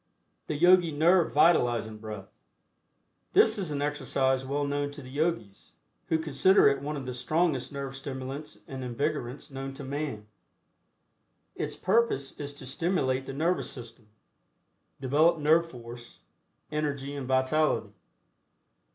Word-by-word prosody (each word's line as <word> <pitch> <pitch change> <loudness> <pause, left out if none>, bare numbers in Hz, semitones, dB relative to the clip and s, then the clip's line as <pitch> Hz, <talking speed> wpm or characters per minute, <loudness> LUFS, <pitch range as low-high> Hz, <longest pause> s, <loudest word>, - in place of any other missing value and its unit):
THE 155 - -2
YOGI 175 +1 +5
NERVE 170 +3 +4
VITALIZING 120 -9 +3
BREATH. 105 -3 -8 1.0
This - - +5
is 185 -5 -2
an 145 -1 -2
exercise 135 -3 0
well 140 +2 -1
known 145 0 -1
to 145 - -10
the 130 - -11
Yogis, 145 - -2 0.3
who 160 - +2
consider 160 +5 +4
it 140 -1 +2
one 150 +1 -3
of 135 - -6
the 125 - -4
strongest 150 +2 0
nerve 140 -1 -5
stimulants 135 +2 -7
and 130 -1 -6
invigorants 140 +2 -3
known 135 0 -6
to 140 - -8
man. 140 -6 -4 1.3
Its - - -4
purpose 190 - +1
is 145 -1 -5
to 140 - -10
stimulate 135 -2 -1
the - - -5
Nervous 165 +6 0
System, 115 -3 -9 0.9
develop 150 +6 +3
nerve 160 +2 +3
force, 120 -2 -11 0.5
energy 145 -2 -2
and 135 -3 -5
vitality. 130 +4 +1
140 Hz, 135 wpm, -28 LUFS, 130-155 Hz, 1.3 s, YOGI